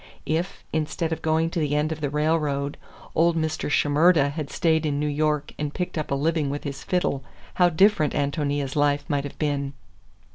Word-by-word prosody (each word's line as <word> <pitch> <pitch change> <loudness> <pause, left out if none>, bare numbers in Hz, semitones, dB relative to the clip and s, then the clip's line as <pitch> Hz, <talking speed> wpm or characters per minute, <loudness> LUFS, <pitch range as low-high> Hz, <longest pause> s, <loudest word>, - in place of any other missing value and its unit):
If, 170 +5 -2
instead 160 +1 -1
of 160 - -5
going 160 +1 +1
to 175 - -1
the 145 -2 0
end 150 +1 +1
of 155 -1 -4
the 145 - 0
railroad, 150 -1 0 0.4
old 170 0 +3
Mr. 155 -1 -1
Shimerda 145 +1 +4
had 150 -1 -5
stayed 160 -1 +1
in 145 -2 0
New 150 - 0
York 150 0 0
and 150 -1 -2
picked 180 - -3
up 155 -2 -3
a 140 - +1
living 155 0 0
with 145 +1 -4
his 140 -2 -5
fiddle, 160 -7 0 0.4
how 175 - +7
different 185 -2 +3
Ántonia's 145 -1 -1
life 145 -1 +2
might 145 -2 0
have 145 - -8
been! 140 -2 -1
150 Hz, 190 wpm, -25 LUFS, 145-160 Hz, 0.4 s, how